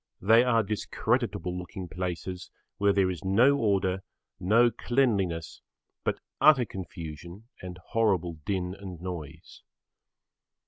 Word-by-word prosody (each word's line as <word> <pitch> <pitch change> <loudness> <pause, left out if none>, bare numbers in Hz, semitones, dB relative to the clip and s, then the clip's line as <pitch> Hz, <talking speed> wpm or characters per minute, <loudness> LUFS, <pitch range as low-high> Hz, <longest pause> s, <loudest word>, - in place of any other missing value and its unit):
They 115 +5 +5
are 115 -3 +3
[Pg 105 +2 -2 0.2
6]discreditable 90 +1 0
looking 90 +1 -6
places 90 +1 -5 0.3
where 100 0 +4
there 95 -2 +2
is 90 +1 -7
no 115 +9 +4
order, 95 -3 +1 0.4
no 115 +6 +4
cleanliness 105 -10 0 0.4
but - - -1 0.2
utter 145 -5 +6
confusion 85 +2 -8
and 90 -1 -7
horrible 90 -8 +1
din 90 -1 -2
and 95 -3 -9
noise. 80 -3 -8
95 Hz, 120 wpm, -28 LUFS, 90-110 Hz, 0.4 s, utter